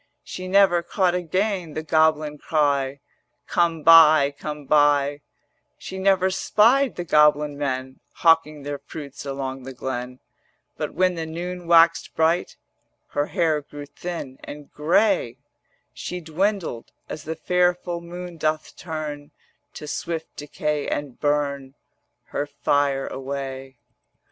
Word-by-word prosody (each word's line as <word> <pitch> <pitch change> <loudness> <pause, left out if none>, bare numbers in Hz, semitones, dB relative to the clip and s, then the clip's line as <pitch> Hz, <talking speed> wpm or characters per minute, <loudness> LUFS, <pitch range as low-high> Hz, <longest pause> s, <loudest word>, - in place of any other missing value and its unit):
She 185 0 -7
never 190 -2 +4
caught 180 0 0
again 180 -1 -1
the 155 - -3
goblin 155 -1 +2
cry: 140 -3 0 0.4
'Come 165 -2 0
buy, 155 -3 +7
come 150 0 -6
buy;' 145 0 +3 0.6
She 190 - -7
never 190 -1 +3
spied 240 +8 +3
the 175 - -4
goblin 150 -2 +3
men 130 -2 -3
Hawking 160 -3 +2
their 145 0 -4
fruits 140 -1 -9
along 135 -1 -4
the 130 +1 -9
glen: 125 0 -5 0.6
But - - -5
when 185 0 +2
the 165 -2 -5
noon 175 +2 -6
waxed 165 0 +4
bright 165 +2 +1 0.5
Her 145 +1 -1
hair 155 -3 +1
grew 145 0 -10
thin 145 -3 -7
and 145 -1 -10
grey; 170 - +2 0.6
She 180 - -5
dwindled, 170 - -2 0.2
as 155 - -7
the 160 +1 -4
fair 180 +2 +2
full 175 -1 -6
moon 175 0 -8
doth 155 0 -2
turn 150 -3 -6 0.5
To - - -7
swift 165 +2 -4
decay 150 0 -3
and 145 -4 -4
burn 140 -2 -1 0.5
Her 145 - -2
fire 140 -1 0
away. 135 -1 -6
155 Hz, 130 wpm, -23 LUFS, 145-175 Hz, 0.6 s, buy